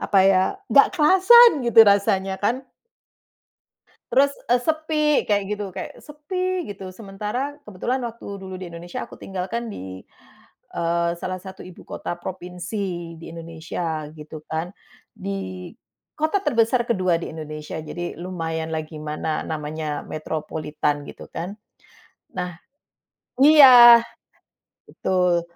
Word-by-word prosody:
apa 200 - +2
ya? 195 -1 +5 0.3
Nggak 280 - +7
kerasan 380 +9 +8
gitu 235 -2 +7
rasanya 195 -1 +2
kan? 245 +6 0 1.4
Terus 280 +1 +3 0.2
e 245 - +5
sepi, 310 +3 -1 0.2
kayak 205 -1 +2
gitu 210 0 -3
kayak - - -6
sepi 365 +5 -3
gitu. 195 -1 -8
Sementara 225 +8 -5
kebetulan 240 +7 -2
waktu 235 0 -13 0.2
dulu 190 -1 -7
di 185 -1 -7
Indonesia 170 +1 -6
aku - - -13
tinggal 185 -2 -5
kan 235 0 -2
di, 95 - -8 0.7
eee, 170 0 0
salah 185 0 -3
satu 190 0 -11
ibu 185 - -13
kota 175 - -5
provinsi 180 -1 -5
di - - -10
Indonesia 165 -1 -5
gitu 155 0 -9
kan. 160 +3 -3 0.4
Di 190 -3 -6 0.5
kota 315 +6 +1
terbesar 240 - +2
kedua 185 -6 +2
di - - -5
Indonesia. 155 -1 -7
Jadi 175 +2 -6
lumayanlah 165 -3 -3
gimana? 155 0 -4
Namanya 155 -1 -4
metropolitan 155 -1 -3
gitu - - -11
kan. 175 +4 -5 0.8
Nah 180 -2 -4 0.9
iya, 255 -6 +10 0.9
betul. 180 -2 +1
185 Hz, 120 wpm, -23 LUFS, 165-235 Hz, 1.4 s, iya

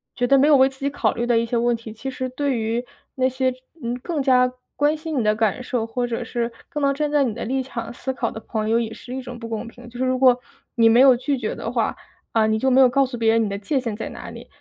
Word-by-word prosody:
觉 245 - 0
得 275 +2 +5
没 280 - +5
有 300 - +7
为 265 0 +5
自 265 0 -17
己 280 - 0
考 285 - 0
虑 235 - -2
的 240 -1 +2
一 230 - +2
些 235 +1 -1
问 240 +1 +2
题， 230 -1 -9
其 225 +5 -6
实 260 -1 -4
对 275 0 -1
于 230 +2 -1 0.3
那 260 -1 +2
些， 260 0 0 0.3
嗯， 235 +1 -2
更 320 +1 -2
加 250 -1 +4 0.3
关 295 +1 +3
心 310 -2 -3
你 230 - +1
的 215 0 +2
感 220 +2 0
受， 240 -2 -2
或 245 +2 -2
者 240 0 -3
是 235 0 -2 0.2
更 295 - -4
能 280 0 +3
站 295 +1 -1
在 290 -2 +3
你 235 - -1
的 235 - -5
立 265 +3 -1
场 235 -3 -6
思 265 +2 -4
考 245 - -2
的 - - -7
朋 220 -1 -3
友 230 +1 +3
也 225 -1 -3
是 250 - -9
一 265 - -4
种 245 -1 -8
不 230 -1 -7
公 225 +1 -4
平。 245 +1 -12
就 240 - -11
是 260 - 0
如 255 0 +1
果 250 -1 +5 0.4
你 230 -2 +5
没 235 +2 +6
有 260 -2 +7
拒 275 +2 -1
绝 220 -3 -3
的 - - -4
话， - - -1 0.3
啊， 225 -1 +3
你 220 0 +2
就 265 - +2
没 260 +1 +4
有 260 - +8
告 275 +3 +3
诉 250 -1 -6
别 225 -1 +3
人 225 0 +3
你 210 - -1
的 200 - -3
界 240 +8 -1
限 230 -4 -3
在 220 - -5
哪 - - -9
里， - - -11
245 Hz, 325 characters per minute, -22 LUFS, 230-265 Hz, 0.4 s, 有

